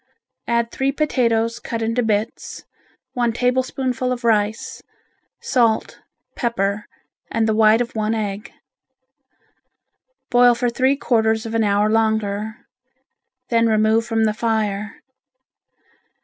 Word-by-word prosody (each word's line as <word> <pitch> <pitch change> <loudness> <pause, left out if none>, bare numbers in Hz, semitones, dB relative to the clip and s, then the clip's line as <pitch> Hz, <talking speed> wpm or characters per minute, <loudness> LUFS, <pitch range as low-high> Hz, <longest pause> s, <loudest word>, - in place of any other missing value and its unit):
Add 235 0 0
three 270 +1 0
potatoes 235 -6 0
cut 230 -1 -4
into 230 +2 0
bits, 215 -2 -2 0.5
one 240 -2 0
tablespoonful 255 +1 -1
of 250 -1 -4
rice, 215 -1 0 0.6
salt, 230 -4 +1 0.4
pepper 205 -4 -1 0.4
and 225 0 0
the 220 - +2
white 220 +1 +4
of 235 - -4
one 215 +1 0
egg. 210 +1 -4 1.8
Boil 245 -1 +5
for 245 0 -1
three 260 +3 +2
quarters 220 -4 +1
of 225 - -5
an 225 -1 +2
hour 205 0 +2
longer, 220 -1 -1 0.8
then 230 -1 +3
remove 220 +1 +2
from 225 -1 0
the 215 -1 +2
fire. 215 -2 -2
225 Hz, 115 wpm, -20 LUFS, 215-240 Hz, 1.8 s, Boil